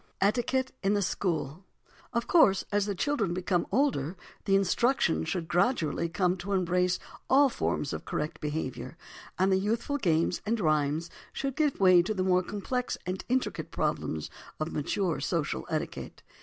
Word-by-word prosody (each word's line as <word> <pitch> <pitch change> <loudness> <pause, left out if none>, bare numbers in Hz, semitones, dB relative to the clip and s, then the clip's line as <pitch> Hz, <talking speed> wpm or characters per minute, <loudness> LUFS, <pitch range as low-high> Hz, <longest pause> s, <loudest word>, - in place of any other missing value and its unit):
ETIQUETTE 250 +6 +1
IN 200 +1 +2
THE 205 - +1
SCHOOL 165 -3 -2 0.5
Of 235 0 -1
course, 195 - +5
as 205 0 +1
the 200 - -1
children 210 -7 0
become 180 -1 0
older, 195 - +1 0.3
the 195 - +3
instruction 195 - +2
should 165 - -2
gradually 170 - +1
come 180 +1 +1
to 200 +3 -4
embrace 180 -1 +2 0.3
all 275 +1 +6
forms 150 - -2
of - - -5
correct 150 +2 -4
behaviour, 150 -3 -4 0.4
and 190 +2 +3
the 190 - +4
youthful 230 +8 -1
games 170 -4 +1
and 225 +2 0
rhymes 155 -1 +1 0.2
should 270 -1 -3
give 300 -3 +1
way 185 -2 +7
to 210 +5 -2
the 185 - 0
more 185 -1 +3
complex 210 +7 -3
and 185 +1 -3
intricate 255 +1 -1
problems 80 -1 -2 0.3
of 155 +1 -2
mature 170 +4 -1
social - - -2
etiquette. - - -4
190 Hz, 155 wpm, -29 LUFS, 170-230 Hz, 0.5 s, way